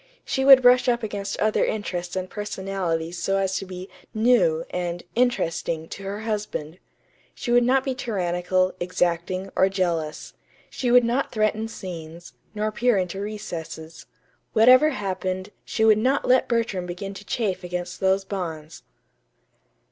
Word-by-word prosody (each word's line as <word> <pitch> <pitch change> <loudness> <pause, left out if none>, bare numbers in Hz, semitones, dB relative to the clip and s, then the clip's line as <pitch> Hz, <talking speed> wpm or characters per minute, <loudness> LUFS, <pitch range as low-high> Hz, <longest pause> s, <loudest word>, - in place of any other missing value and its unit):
She 265 - -1
would 265 -1 +9
brush 250 +1 +6
up 240 -1 +1
against 205 -2 -4
other 215 0 +2
interests 180 -4 -3
and 185 0 -2
personalities 190 -5 -3
so 195 +2 0
as 190 -1 0
to 195 - -5
be 185 0 -7 0.3
"new" 360 - +3
and 175 -1 -3
"interesting" 170 -9 0
to - - -8
her 200 +2 -5
husband. 205 -7 -4 0.6
She 240 - -4
would 245 0 +5
not 260 +2 +3
be 270 - -1
tyrannical, 185 -5 0
exacting, 180 +1 -1
or 190 - +4
jealous. 170 -5 -2 0.4
She 250 - -2
would 245 0 +6
not 240 +4 0
threaten 215 0 0
scenes, 170 -5 -8 0.2
nor 215 +1 -1
peer 240 0 +2
into 185 +1 -2
recesses. 170 -6 -7 0.5
Whatever 255 +6 +7
happened, 190 -5 -3
she 220 - 0
would 215 -1 +6
not 260 +5 +1
let 255 0 +4
Bertram 225 -7 -1
begin 195 +3 -5
to 195 - -10
chafe 205 -5 -2
against 180 0 -5
those 190 0 +2
bonds! 165 -5 -5
195 Hz, 150 wpm, -24 LUFS, 180-225 Hz, 0.6 s, would